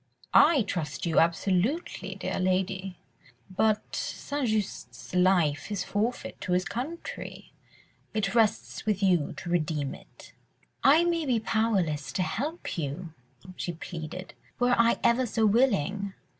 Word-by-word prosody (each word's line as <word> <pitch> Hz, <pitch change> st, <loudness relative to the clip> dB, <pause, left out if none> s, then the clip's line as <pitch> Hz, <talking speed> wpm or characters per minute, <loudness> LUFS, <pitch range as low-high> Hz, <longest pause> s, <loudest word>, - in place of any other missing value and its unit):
"I 290 Hz, -8 st, +6 dB
trust 175 Hz, -6 st, -3 dB
you 165 Hz, -2 st, +3 dB
absolutely, 190 Hz, -, 0 dB
dear -, -, -3 dB
lady, 185 Hz, 0 st, -1 dB, 0.6 s
but 215 Hz, +1 st, +1 dB
St. 285 Hz, -2 st, -3 dB
Just's 215 Hz, -4 st, -3 dB
life 180 Hz, -4 st, +2 dB
is 205 Hz, -, -1 dB
forfeit 220 Hz, +5 st, -2 dB
to 180 Hz, -, -1 dB
his 180 Hz, +1 st, +2 dB
country... 285 Hz, -, -6 dB, 0.6 s
it 200 Hz, -3 st, -1 dB
rests 225 Hz, -3 st, +1 dB
with 205 Hz, -2 st, +1 dB
you 180 Hz, -6 st, +2 dB
to 170 Hz, -, -6 dB
redeem 155 Hz, -4 st, 0 dB
it." -, -, -15 dB, 0.5 s
"I 300 Hz, +5 st, +6 dB
may 335 Hz, -3 st, 0 dB
be 245 Hz, -3 st, +2 dB
powerless 200 Hz, -10 st, 0 dB
to 185 Hz, -, +1 dB
help 290 Hz, -, -3 dB
you," 160 Hz, +3 st, -4 dB, 0.4 s
she 175 Hz, -, -3 dB
pleaded, 165 Hz, +2 st, -7 dB, 0.3 s
"were 245 Hz, 0 st, +3 dB
I 230 Hz, 0 st, +4 dB
ever 245 Hz, +2 st, +3 dB
so 220 Hz, 0 st, +1 dB
willing." 200 Hz, -, +2 dB
195 Hz, 130 wpm, -28 LUFS, 175-235 Hz, 0.6 s, I